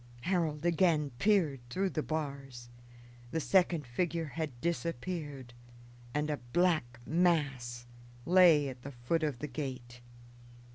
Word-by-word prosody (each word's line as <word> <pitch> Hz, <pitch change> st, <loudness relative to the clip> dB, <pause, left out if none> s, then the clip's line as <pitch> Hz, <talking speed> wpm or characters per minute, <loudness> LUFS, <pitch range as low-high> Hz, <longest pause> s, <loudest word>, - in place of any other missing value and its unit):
Harold 165 Hz, -2 st, -1 dB
again 165 Hz, -4 st, +2 dB
peered 180 Hz, -9 st, +3 dB
through 190 Hz, +9 st, -1 dB
the 155 Hz, -, -1 dB
bars. 140 Hz, -6 st, -5 dB, 0.6 s
The 160 Hz, -, -1 dB
second 165 Hz, +2 st, +2 dB
figure 165 Hz, +6 st, -1 dB
had 150 Hz, -5 st, -5 dB
disappeared, 160 Hz, -5 st, -3 dB, 0.6 s
and 150 Hz, +2 st, -1 dB
a 150 Hz, -, -1 dB
black 125 Hz, -3 st, 0 dB
mass 140 Hz, -8 st, +1 dB, 0.4 s
lay 170 Hz, -5 st, +6 dB
at 130 Hz, -2 st, -7 dB
the 140 Hz, -, -7 dB
foot 125 Hz, +7 st, -1 dB
of 150 Hz, -5 st, -1 dB
the 150 Hz, -, -5 dB
gate. 125 Hz, -3 st, -6 dB
150 Hz, 125 wpm, -32 LUFS, 125-170 Hz, 0.6 s, lay